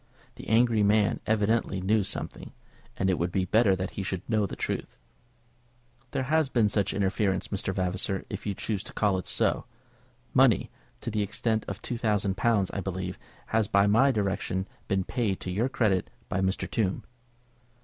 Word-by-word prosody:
The - - -11
angry 115 0 +4
man 105 0 +3
evidently 110 -2 +1
knew 100 +3 +2
something, 95 - -5 0.4
and 95 - +1
it 95 -2 +1
would 85 +1 0
be 95 0 +1
better 105 0 +4
that 95 0 -3
he - - -4
should 95 -1 -4
know 110 -3 +2
the - - -6
truth. - - -4 1.1
"There 130 +1 -1
has 155 +1 +2
been 115 -5 +3
such 100 -1 +1
interference, 95 -1 0
Mr. 95 -1 -2
Vavasor, 95 +1 -1
if 100 +1 -6
you 100 - -1
choose 105 -1 -2
to - - -9
call 100 -3 +2
it 90 - -8
so. - - +1 0.7
Money, - - +4 0.3
to 115 - -3
the 105 0 0
extent 110 +2 0
of 100 - -6
two 120 - -3
thousand 105 -4 +1
pounds, 105 -4 +2
I 100 - -3
think, 95 0 -4 0.3
has 110 -2 +1
by 100 -2 +4
my 115 +7 +5
directions 100 -4 -1 0.2
been 95 -2 +1
paid 110 -3 -1
to 90 - -4
your 110 +8 0
credit 105 -8 +1 0.2
by 95 - 0
Mr. 95 +1 0
Tombe." 100 -5 -1
100 Hz, 180 wpm, -28 LUFS, 95-110 Hz, 1.1 s, my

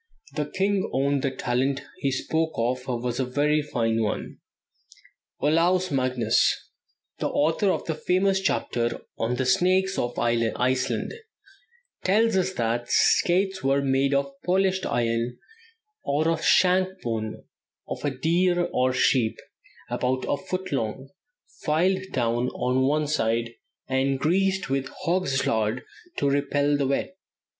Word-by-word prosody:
The 150 - -2
king 195 +2 0
owned 140 +1 +1
that 135 -1 -2
the - - -7
talent 130 +3 0 0.2
he 140 - 0
spoke 160 +4 -1
of 125 +2 -1 0.2
was 125 0 -2
a - - +2
very 145 +4 +1
fine 115 -6 0
one." 105 - -3 1.0
Olaus 175 +5 +2
Magnus, 130 -4 +1 0.5
the - - 0
author 160 +7 +1
of - - -1
the 160 - -1
famous 190 +4 +1
chapter 120 -10 -1 0.2
on 115 +2 0
the 130 +1 -1
Snakes 185 +6 +2
of 120 0 -2
Iceland, 125 - 0 0.9
tells 220 +3 +3
us 190 0 +1
that 120 -1 -1
skates 190 +2 +2
were 135 +1 +2
made 135 +1 +2
"of 140 0 0
polished 190 +1 +1
iron, 115 0 -1 0.7
or 150 +3 +1
of 165 - 0
the - - -8
shank 185 +1 +3
bone 110 -2 -3 0.4
of - - -6
a 145 - +1
deer 175 +5 +1
or 130 0 +2
sheep, 125 -3 +2 0.5
about 130 +1 -1
a - - +1
foot 185 +3 -5
long, 130 0 -3 0.5
filed 185 +5 +1
down 120 -1 0
on 130 +1 0
one 150 +2 +1
side, 115 -5 0 0.4
and 135 +1 +1
greased 190 +6 +1
with 135 0 -1
hog's 165 -6 +1
lard 110 +2 0 0.3
to 140 - +1
repel 145 +1 +1
the 140 -2 0
wet." 140 +6 -1
140 Hz, 140 wpm, -25 LUFS, 125-180 Hz, 1.0 s, tells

